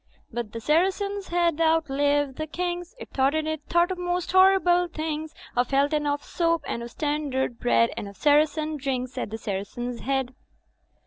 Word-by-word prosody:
' - - -37
"But 235 -3 -4
the 230 - -5
Saracen's 385 - +1
Head 340 -2 +1
outlived 290 -3 +2
the 310 - -2
Kings, 355 +4 -4
It - - -10
thought 270 +2 +2
and 315 0 0
it 315 -1 -2
thought 345 +2 +3
of 365 - -4
most 355 0 -1
horrible 375 -2 +5
things; 315 -1 -4 0.2
Of 245 0 +1
Health 280 +2 +2
and 300 -1 +1
of 290 0 -1
Soap 335 -2 0
and 235 - -3
of 235 - -6
Standard 285 -3 -2
Bread, 115 -1 +3
And 205 - -5
of 200 - -11
Saracen 305 +1 +2
drinks 260 -2 -3
at - - -3
the 220 - -5
Saracen's 225 +4 -4
Head." 265 -1 -1
300 Hz, 185 wpm, -26 LUFS, 260-345 Hz, 0.2 s, horrible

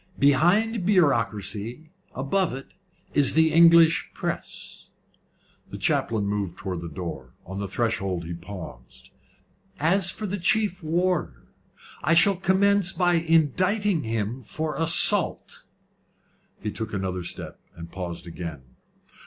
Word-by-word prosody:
Behind 180 - +3
bureaucracy 120 - 0 0.2
above 150 +4 -1
it 135 - -10 0.4
is 145 -2 +3
the 160 0 +3
English 165 0 +6
press." - - -4 0.8
The - - -7
chaplain 110 -3 0
moved 100 -3 -3
towards 90 -3 -5
the 85 - -6
door. 75 -7 -7
On 95 +2 -6
the 100 - -3
threshold 95 -5 -2
he 85 - -5
paused. 85 -8 -10 0.7
"As 175 +4 +2
for 215 - -6
the 200 0 -3
chief 195 +1 +1
warder, 165 - -1 0.6
I 155 +3 +3
shall 195 +4 +5
commence 190 0 +2
by 180 -2 +1
indicting 170 - +1
him 115 +1 -3
for 155 +7 -4
assault." 165 0 +3 1.0
He 105 - -2
took 110 0 -6
another 95 -2 -3
step, - - -8 0.2
and 85 0 -10
paused 90 -2 -6
again. 85 -5 -7
140 Hz, 120 wpm, -25 LUFS, -, 1.0 s, English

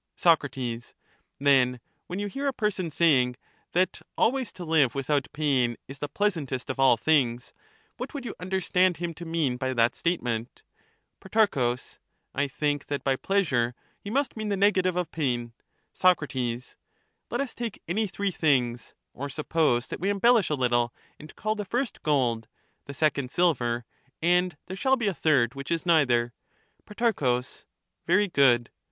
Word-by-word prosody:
Soc, 165 -2 +4 1.0
Then 130 -3 +3 0.3
when 180 - -5
you 205 - -2
hear 275 +8 -3
a 275 - +1
person 205 -7 -1
saying, 140 -6 +3 0.4
that 180 +1 +1 0.2
always 260 0 +1
to 180 - -8
live 155 -6 +3
without 140 0 0
pain 130 -6 +1
is 135 +1 -9
the 145 - -4
pleasantest 155 -12 -1
of 130 - -8
all 135 -3 +5
things, 125 -2 +1 0.4
what - - -5
would 280 -4 -6
you - - -4
understand 185 -1 +1
him 170 -1 -3
to 170 +2 -9
mean 160 -7 0
by 130 +1 -2
that 115 0 +3
statement? 120 -9 -2 0.6
Pro. 190 - +2 0.6
I 145 +1 0
think 145 0 -2
that 145 -1 -3
by 135 -1 +2
pleasure 130 -10 0 0.2
he 200 - -8
must 270 +3 0
mean 215 -1 -3
the 200 - 0
negative 185 -2 +3
of 180 -3 -2
pain. 120 -6 -2 0.4
Soc, 185 -3 +4
Let 125 - -6
us 275 -4 -2
take 235 -4 -6
any 210 +6 0
three 200 +1 -2
things; 125 -8 0 0.2
or 140 +2 -5
suppose 145 -3 +1
that - - -5
we 190 +4 0
embellish 210 0 +4
a 150 - +1
little 120 -2 +1 0.3
and 155 - -12
call 215 0 -1
the 210 -1 -4
first 245 +5 -3
gold, 120 -7 +1 0.4
the 140 - -8
second 140 -3 +1
silver, 125 -8 +1 0.3
and 180 -1 +2
there 190 - -6
shall 265 +6 +2
be 240 - -2
a 200 - +1
third 135 -8 +2
which 140 0 -7
is 170 0 -1
neither. 125 -8 +3 0.5
Pro, 205 - +1 0.7
Very 195 +4 +4
good. 130 -8 +3
155 Hz, 160 wpm, -27 LUFS, 125-190 Hz, 1.0 s, all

